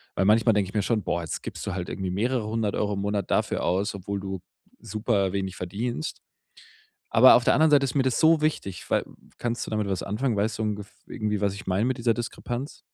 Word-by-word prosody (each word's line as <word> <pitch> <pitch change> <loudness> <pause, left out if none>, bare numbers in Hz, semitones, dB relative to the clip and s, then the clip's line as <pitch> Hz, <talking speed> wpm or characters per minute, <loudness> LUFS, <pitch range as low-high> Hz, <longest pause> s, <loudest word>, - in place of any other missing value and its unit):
Weil 95 - +1
manchmal 110 +2 +5
denke 100 -2 +1
ich - - -12
mir 105 - +3
schon: 110 -4 0
„Boah, 85 - -1
jetzt 80 - -4
gibst - - -6
du - - -2
halt 90 -2 -4
irgendwie 95 -1 -3
mehrere 115 +3 0
100€ 105 -2 -1
im 100 - -2
Monat 100 -1 -2
dafür - - +1
aus, 100 +4 0
obwohl 100 +1 -4
du 95 -1 -5 0.4
superwenig 100 -3 -1
verdienst.“ 100 +1 -4 0.9
Aber 120 +3 +8
auf 120 - +4
der - - +4
anderen 160 0 +4
Seite 140 -1 +6
ist 130 - -2
mir 135 - +4
das 130 -2 +1
so 160 -1 +5
wichtig, 125 - -2
weil - - +2 0.3
Kannst 120 0 -2
du - - -7
damit 105 -2 -1
was 95 -2 -1
anfangen? 110 +3 -1
Weißt 105 +2 0
du - - -1
ungef 105 -2 -3
irgendwie, 105 -1 -2
was 100 -1 +1
ich 100 - -9
meine 95 +4 +1
mit 130 +1 0
dieser 115 -1 +2
Diskrepanz? 120 +3 -5
105 Hz, 225 wpm, -26 LUFS, 100-120 Hz, 0.9 s, Aber